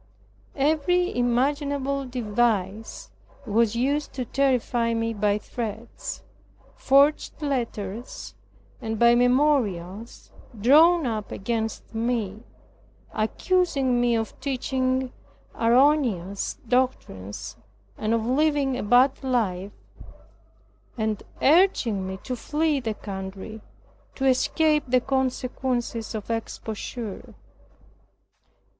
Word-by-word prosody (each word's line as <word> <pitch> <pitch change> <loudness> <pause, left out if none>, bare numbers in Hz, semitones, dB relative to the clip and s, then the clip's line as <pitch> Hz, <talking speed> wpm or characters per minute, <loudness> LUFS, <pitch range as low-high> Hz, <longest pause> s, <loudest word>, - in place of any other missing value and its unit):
Every 315 +5 +1
imaginable 275 +3 0
device 220 -3 -1 0.3
was 225 +1 +2
used 285 +5 0
to 255 -2 -3
terrify 245 -3 +1
me 230 0 -1
by 205 -1 +1
threats, 225 +1 -6 0.5
forged 280 +3 +3
letters, 240 -6 -4 0.5
and 220 0 -3
by 235 +2 +6
memorials 240 - +1 0.3
drawn 315 +8 +6
up 220 -4 -3
against 225 +2 -3
me, 225 -3 -2 0.7
accusing 270 +1 +1
me 240 -1 +3
of 225 -1 -3
teaching 260 -1 -1 0.4
erroneous 230 - +2
doctrines, 100 - -2 0.4
and 215 - -2
of 225 -1 -1
living 280 +1 +2
a 250 - -3
bad 250 +6 +3
life 205 -7 -1 1.3
and 220 -2 -1 0.2
urging 270 - +3
me 190 0 -5
to 255 - -3
flee 300 +4 0
the 225 -4 -3
country 195 +2 -7 0.5
to 270 - -2
escape 300 +3 +3
the 255 +1 +4
consequences 255 -3 -2
of 215 +1 -5
exposure. 225 -1 -5
245 Hz, 90 wpm, -25 LUFS, 220-270 Hz, 1.3 s, by